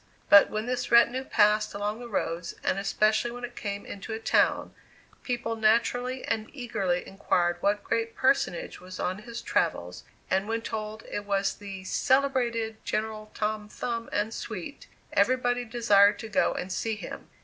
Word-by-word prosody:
But 200 -1 +9
when 215 +1 -3
this 250 0 -2
retinue 235 +2 +5
passed 210 -2 +3
along 205 +2 -2
the 240 -1 -8
roads, 170 -4 -2
and 195 - +1
especially 215 +3 +2
when 245 +1 -8
it 240 0 -6
came 200 -1 -4
into 200 +3 -7
a 220 - -3
town, 225 - +2 0.5
people 240 -2 -2
naturally 235 +3 +1
and 220 0 -2
eagerly 210 -9 -1
inquired 175 -2 0
what 205 +1 +1
great 230 0 -1
personage 260 -9 +1
was 185 0 -9
on 185 +3 -1
his 235 +2 -8
travels, - - -1 0.2
and 190 +2 +1
when 225 0 -2
told 215 0 -4
that - - -13
it 205 - -5
was 195 -1 +1
"the 195 -2 -8
celebrated 235 -1 +1
General 215 0 -3
Tom 210 0 -2
Thumb 230 +1 -4
and 210 +2 -1
suite," 230 - -7 0.3
everybody 245 -1 +2
desired 210 -4 +4
to 225 - -7
go 210 - +2
and 185 - -4
see 225 +2 -1
him. 210 - -8
220 Hz, 165 wpm, -28 LUFS, 205-240 Hz, 0.5 s, But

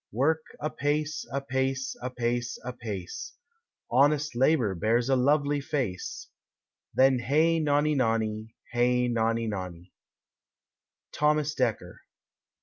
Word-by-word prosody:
Work 155 +8 +1
apace, 150 +1 -2
apace, 135 0 -1
apace, 120 -1 -2
apace; 105 -7 -6 0.6
Honest 145 +2 +3
labor 130 -5 +3
bears 115 +7 +1
a 135 - +4
lovely 145 +2 +2
face; 135 -11 -3 0.6
Then 130 -1 +4
hey 155 +7 +2
nonny 150 0 +2
nonny, 110 -4 -1 0.2
hey 125 +1 +2
nonny 115 -1 0
nonny! 90 -4 -6 1.2
_Thomas 150 0 +1
Dekker. 110 -9 -1
130 Hz, 95 wpm, -28 LUFS, 115-145 Hz, 1.2 s, a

